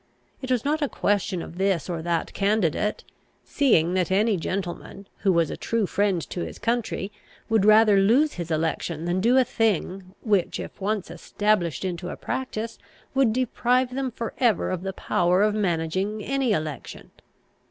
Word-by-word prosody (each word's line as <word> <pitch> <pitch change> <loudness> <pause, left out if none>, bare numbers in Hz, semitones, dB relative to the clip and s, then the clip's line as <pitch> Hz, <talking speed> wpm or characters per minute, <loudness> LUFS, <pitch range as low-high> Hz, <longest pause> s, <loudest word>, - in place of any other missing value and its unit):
It 260 - -6
was 250 -1 +1
not 305 +2 0
a 290 - 0
question 200 -3 0
of 175 - -10
this 195 -4 +1
or 170 -3 -3
that 170 0 -2
candidate, 205 -1 0 0.4
seeing 180 - +2
that 185 -1 +1
any 210 +3 +2
gentleman, 185 +2 -5
who 195 - +2
was 170 -3 +2
a - - -3
true 230 -2 0
friend 195 -3 0
to 175 - -3
his - - -7
country, 230 -4 -2 0.4
would 220 -3 +3
rather 215 -1 +6
lose 250 +10 +3
his 170 -2 -6
election 160 0 -2
than 175 +2 0
do 240 +5 +4
a 260 - +6
thing 195 -4 -1
which, 205 -6 +1
if - - -8
once 205 -1 -2
established 200 -5 -1
into 180 -1 -4
a - - -6
practice, 230 -3 -4 0.3
would 265 -4 +3
deprive 250 +1 +1
them 265 0 -1
for 230 -1 -5
ever 230 -8 +2
of 185 -2 -2
the 190 +1 -4
power 180 +1 +1
of 210 0 +2
managing 190 +2 -1
any 270 -1 0
election. 155 - -4
200 Hz, 170 wpm, -25 LUFS, 175-230 Hz, 0.4 s, rather